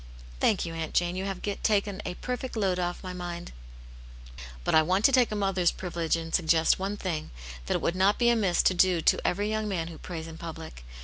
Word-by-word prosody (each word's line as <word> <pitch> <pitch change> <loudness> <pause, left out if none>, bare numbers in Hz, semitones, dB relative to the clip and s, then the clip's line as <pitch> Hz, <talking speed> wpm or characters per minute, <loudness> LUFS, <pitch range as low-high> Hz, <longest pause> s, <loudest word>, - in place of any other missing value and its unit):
" - - -17
Thank 195 - +2
you. 165 - -5
Aunt 160 -1 -5
Jane, 175 0 +2
you 190 +1 -3
have 195 -2 -4 0.2
taken 205 -2 +1
a 180 - -4
perfect 250 +3 -4
load 190 -4 +1
off 175 +1 -3
my 185 -1 -5
mind." 175 -1 -6 1.1
"But - - 0
I 160 - +7
want 185 +6 +1
to - - +7
take 250 -4 +4
a - - -1
mother's 195 -4 +2
privilege 170 -3 -2
and 165 0 -6
suggest 165 -1 +3
one 195 +2 -2
thing, 170 -6 -3 0.4
that - - +1
it - - -1
would 170 - 0
not 195 +2 +3
be 240 -1 +4
amiss 205 -7 +2
to - - +4
do 180 -1 +3
to - - +3
every 205 +3 0
young 215 0 -1
man 170 -5 -2
who 165 - -10
prays 165 -3 -6
in 165 0 -10
public. 160 - -8
180 Hz, 230 wpm, -28 LUFS, 165-200 Hz, 1.1 s, I